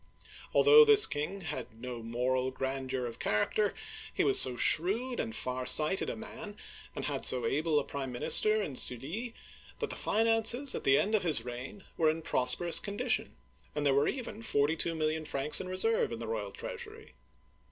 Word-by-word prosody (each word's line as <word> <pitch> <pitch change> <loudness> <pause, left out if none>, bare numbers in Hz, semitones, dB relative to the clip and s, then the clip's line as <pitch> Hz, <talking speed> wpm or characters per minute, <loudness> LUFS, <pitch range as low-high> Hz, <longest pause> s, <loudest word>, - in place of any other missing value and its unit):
Although 445 +1 +6
this 435 -2 +9
king 155 +7 -4
had 125 -9 -7
no 125 -1 -8
moral 125 +3 -2
grandeur 130 -1 -5
of 120 - -8
character, 195 - -1 0.4
he - - -1
was 400 -1 +3
so 125 - +3
shrewd 225 - +3
and 225 0 -4
far 130 0 -4
sighted 155 +8 +1
a - - -5
man, 220 -1 -10 0.4
and - - -5
had 140 -2 -4
so 125 -2 +3
able 150 +5 0
a - - -4
prime 135 -2 -6
minister 215 - +3
in 145 -8 -7
Sully, 165 - -4 0.4
that - - -5
the - - -6
finances 225 +4 +2
at - - -6
the 135 0 +4
end 210 - -1
of 215 - +2
his 155 -9 +2
reign 125 +11 -9
were 160 -1 +2
in 160 +1 -4
prosperous 140 +8 +3
condition, 205 0 -3 0.4
and 150 -1 -3
there 140 - +2
were 140 +2 +1
even 235 -4 -5
forty 145 -6 0
two 165 0 -2
million 155 0 -2
francs 145 0 -1
in 185 - -8
reserve 205 - 0
in 115 - -5
the 115 - -7
royal 110 -3 -5
treasury. 65 - -9
155 Hz, 185 wpm, -30 LUFS, 130-215 Hz, 0.4 s, this